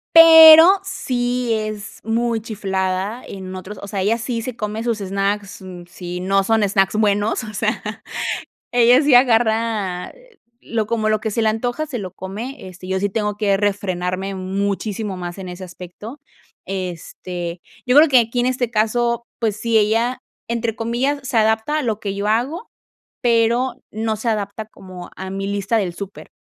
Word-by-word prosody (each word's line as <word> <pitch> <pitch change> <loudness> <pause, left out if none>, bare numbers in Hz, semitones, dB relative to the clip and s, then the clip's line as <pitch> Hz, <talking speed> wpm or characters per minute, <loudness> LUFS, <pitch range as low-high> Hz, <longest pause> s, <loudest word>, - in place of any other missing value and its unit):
pero 325 +3 +10
sí 245 -8 -2
es 215 -1 -5
muy 230 +1 0
chiflada 195 0 -3
en 190 -1 -8
otros 190 +3 -8
o 200 - -7
sea, 195 -1 -3
ella 225 +5 +1
sí 235 -1 -3
se 255 -1 -5
come 215 0 -4
sus 230 -3 -1
snacks, 200 +1 -2
mm, 180 -2 -9
si 180 0 -7
no 195 +2 +1
son 220 +2 +2
snacks 195 +1 +2
buenos, 210 +1 +1
o 215 - -7
sea, 215 +1 -1 0.9
ella 245 +2 +5
sí 285 -4 +4
agarra 225 -6 +2 0.5
lo 225 -2 -2
como 215 -1 0
lo 215 -1 +2
que 220 -1 -3
se 230 - -1
le 220 - +3
antoja, 245 +7 -2
se 255 -5 -4
lo 185 -3 -6
come. 210 +6 -7
Este, 185 0 -11
yo 190 0 -1
sí 205 +1 0
tengo 210 0 -2
que 205 -2 +2
refrenarme 195 -2 -2
muchísimo 200 +2 -3
más 175 0 -6
en 185 -1 -7
ese 180 +1 -8
aspecto. 185 - -10 0.5
Este, 180 -1 -5 0.3
yo 250 - +3
creo 310 +2 +8
que 255 -2 +6
aquí 235 +1 -1
en 245 - +2
este 250 -2 -1
caso, 235 +2 0
pues 220 -3 -1
sí, 230 -1 +2
ella 230 +4 +1 0.3
entre 230 -1 -2
comillas 260 +5 -1
se 250 -3 0
adapta 220 +7 +2
a - - -1
lo 220 -3 -1
que 200 -2 -3
yo 200 +1 -2
hago, 260 - -1 0.5
pero 235 +1 +2 0.2
no 220 +1 -2
se 220 +3 -2
adapta 210 0 -3
como 185 -4 -11
a 190 0 -6
mi 195 0 -4
lista 200 +2 0
del 190 -5 -1
súper. 200 +1 -9
215 Hz, 175 wpm, -20 LUFS, 195-235 Hz, 0.9 s, pero